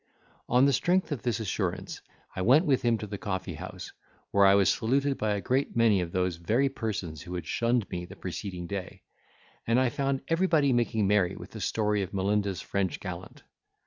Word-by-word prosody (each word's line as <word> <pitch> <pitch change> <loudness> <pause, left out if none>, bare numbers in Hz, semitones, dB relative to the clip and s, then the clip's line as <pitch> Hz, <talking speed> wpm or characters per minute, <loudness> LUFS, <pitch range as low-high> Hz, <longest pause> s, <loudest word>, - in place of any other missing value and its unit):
On 125 +2 +5
the 140 - +3
strength 180 +5 +1
of 140 -6 -2
this 120 -1 -1
assurance, 100 -4 -3 0.3
I - - -2
went 135 - +5
with 135 -5 +2
him 120 -1 +2
to 105 - -6
the 100 -1 -6
coffee 95 -3 -3
house, 90 +2 -8 0.4
where 100 -1 +5
I 100 - +6
was 100 -1 +4
saluted 135 +4 +1
by 105 -1 +1
a 100 - -3
great 130 +6 0
many 115 -5 +4
of 85 -1 -4
those 90 -2 0
very 115 +11 +1
persons 100 - -4
who 90 - -7
had 90 - -4
shunned 120 -2 0
me 90 -1 -4
the - - -11
preceding 90 -4 -5
day; 95 0 -6 0.6
and 115 +2 +3
I 130 -1 +3
found 135 +2 -1
everybody 165 -5 +3
making 115 -3 +1
merry 95 -3 +2
with - - -10
the - - -8
story 105 -2 0
of 95 +1 -5
Melinda's 100 -1 0
French 95 -5 -2
gallant. 90 -1 -8
105 Hz, 200 wpm, -28 LUFS, 95-125 Hz, 0.6 s, I